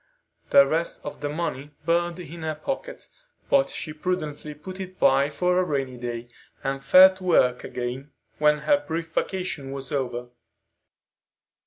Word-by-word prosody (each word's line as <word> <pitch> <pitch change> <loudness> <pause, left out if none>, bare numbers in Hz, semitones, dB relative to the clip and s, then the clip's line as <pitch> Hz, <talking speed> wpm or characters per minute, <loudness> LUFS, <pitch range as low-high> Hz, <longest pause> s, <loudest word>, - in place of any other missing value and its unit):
The 280 0 +8
rest 165 +2 -2
of 145 - -7
the 145 - -2
money 150 -2 -4
burned 175 +1 +1
in 170 -1 -8
her 160 -1 -2
pocket, 275 - -5 0.4
but 275 -1 +4
she 155 - -5
prudently 155 -3 -3
put 185 +5 -9
it 185 -1 -7
by 135 +1 +4
for 180 +3 +1
a - - +3
rainy 135 -6 -2
day, 120 -1 -5 0.4
and 135 0 -2
fell 185 +3 +8
to 185 - -12
work 125 -8 +3
again 125 +3 -5 0.3
when 150 0 +4
her 290 - +2
brief 165 - -4
vacation 180 -9 -2
was 135 0 -6
over. 125 -3 -2
155 Hz, 155 wpm, -25 LUFS, 135-180 Hz, 0.4 s, The